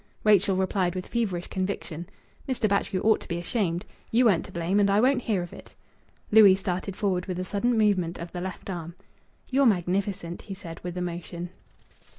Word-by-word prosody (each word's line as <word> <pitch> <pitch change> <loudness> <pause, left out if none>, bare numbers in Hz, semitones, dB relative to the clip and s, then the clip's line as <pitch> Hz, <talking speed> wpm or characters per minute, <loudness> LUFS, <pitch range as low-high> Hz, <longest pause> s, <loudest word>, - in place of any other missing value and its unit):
Rachel 205 -2 +4
replied 185 -1 0
with 185 - -4
feverish 195 -7 -1
conviction 185 -3 -4 0.4
"Mr. 250 -4 +1
Batchgrew 200 -2 0
ought 220 0 +3
to - - -11
be 170 - -2
ashamed. 175 -1 -1 0.2
You 245 +2 +3
weren't 185 -7 +4
to - - -11
blame, 175 +4 0
and 200 -1 +4
I 200 +1 +4
won't 255 +2 +3
hear 205 -6 0
of 175 - -9
it!" - - -13 0.6
Louis 210 -3 +8
started 190 0 -3
forward 190 -4 -1
with 185 -2 -3
a 185 - -3
sudden 225 +5 0
movement 190 -6 +2
of 170 0 -7
the 175 - -5
left 185 0 -6
arm. 170 -1 -6 0.5
"You're 270 0 +4
magnificent," 185 -2 0
he 195 - -7
said, 170 -4 -9
with 180 0 -6
emotion. 175 0 -5
185 Hz, 185 wpm, -27 LUFS, 175-205 Hz, 0.6 s, Louis